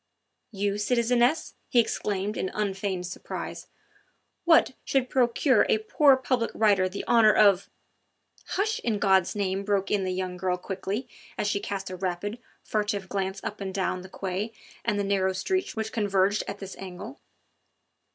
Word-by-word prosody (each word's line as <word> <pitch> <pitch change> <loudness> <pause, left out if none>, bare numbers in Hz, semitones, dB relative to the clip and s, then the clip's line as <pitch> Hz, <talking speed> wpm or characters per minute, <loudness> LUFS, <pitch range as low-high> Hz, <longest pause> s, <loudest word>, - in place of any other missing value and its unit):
"You, 200 0 -1
citizeness," 245 +6 +2 0.2
he 245 - +4
exclaimed 205 -2 0
in 190 - -2
unfeigned 195 -3 -2
surprise, 175 - -6 0.8
"what 330 -5 +5
should 260 -2 0
procure 250 -1 +3
a - - +4
poor 265 +5 +4
public 255 -3 0
writer 200 -4 +3
the 195 - -6
honour 225 -2 +6
of 200 -3 +4 0.4
" - - -33
"Hush, 430 +3 0
in 225 -3 -1
God's 190 -2 +3
name!" 195 -1 -1
broke 200 -1 0
in 205 -2 +2
the 185 - -1
young 185 0 -3
girl 180 0 0
quickly 195 +6 -4 0.3
as - - -1
she 205 -1 +1
cast 195 -2 -4
a - - -4
rapid, 190 +5 -3 0.2
furtive 210 -3 -2
glance 195 0 -2
up 210 - -5
and 195 -1 -3
down 185 -1 -1
the 185 - -11
quai 195 +4 -4 0.3
and 210 -3 0
the - - +1
narrow 195 -1 +1
streets 370 - -1
which 220 0 -3
converged 205 -1 +1
at 200 - -4
this 195 -1 -8
angle. 195 +7 -8
200 Hz, 160 wpm, -27 LUFS, 190-225 Hz, 0.8 s, honour